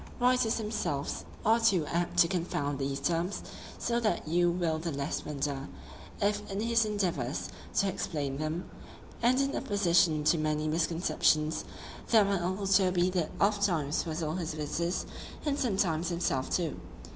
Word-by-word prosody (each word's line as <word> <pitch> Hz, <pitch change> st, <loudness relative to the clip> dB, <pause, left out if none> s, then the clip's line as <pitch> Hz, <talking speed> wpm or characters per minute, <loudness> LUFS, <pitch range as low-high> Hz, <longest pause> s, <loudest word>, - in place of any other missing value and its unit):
Writers 250 Hz, -2 st, +3 dB
themselves 210 Hz, -10 st, -2 dB, 0.2 s
are 225 Hz, +2 st, +5 dB
too 195 Hz, -8 st, +3 dB
apt 175 Hz, +2 st, -2 dB
to 175 Hz, -1 st, +7 dB
confound 150 Hz, -6 st, -2 dB
these 135 Hz, 0 st, -2 dB
terms; 170 Hz, +6 st, -1 dB, 0.3 s
so 235 Hz, 0 st, 0 dB
that 215 Hz, -8 st, 0 dB
you 175 Hz, +2 st, +3 dB
will 170 Hz, -2 st, 0 dB
the 165 Hz, +1 st, -3 dB
less 140 Hz, 0 st, -3 dB
wonder, 140 Hz, -2 st, -3 dB, 0.5 s
if 205 Hz, 0 st, +1 dB
in 195 Hz, -, -2 dB
his 230 Hz, 0 st, +2 dB
endeavours 175 Hz, -, -1 dB, 0.3 s
to 200 Hz, -, +3 dB
explain 145 Hz, -7 st, -3 dB
them, 155 Hz, +3 st, -3 dB, 0.5 s
and 250 Hz, +2 st, +4 dB
in 275 Hz, 0 st, +1 dB
opposition 170 Hz, -6 st, +2 dB
to 160 Hz, +2 st, +3 dB
many 155 Hz, 0 st, 0 dB
misconceptions, 160 Hz, -1 st, +1 dB, 0.4 s
that 220 Hz, -3 st, +5 dB
my 200 Hz, -1 st, +1 dB
uncle 185 Hz, +3 st, -2 dB
Toby 185 Hz, -2 st, +3 dB
did 180 Hz, -4 st, 0 dB
oft 200 Hz, 0 st, +2 dB
times 155 Hz, -5 st, 0 dB
puzzle 160 Hz, -1 st, -3 dB
his 165 Hz, -3 st, -3 dB
visitors, 170 Hz, +4 st, -2 dB, 0.4 s
and 290 Hz, -1 st, 0 dB
sometimes 180 Hz, -8 st, +1 dB
himself 170 Hz, -6 st, -1 dB
too. 170 Hz, -4 st, -1 dB
175 Hz, 150 wpm, -30 LUFS, 155-200 Hz, 0.5 s, to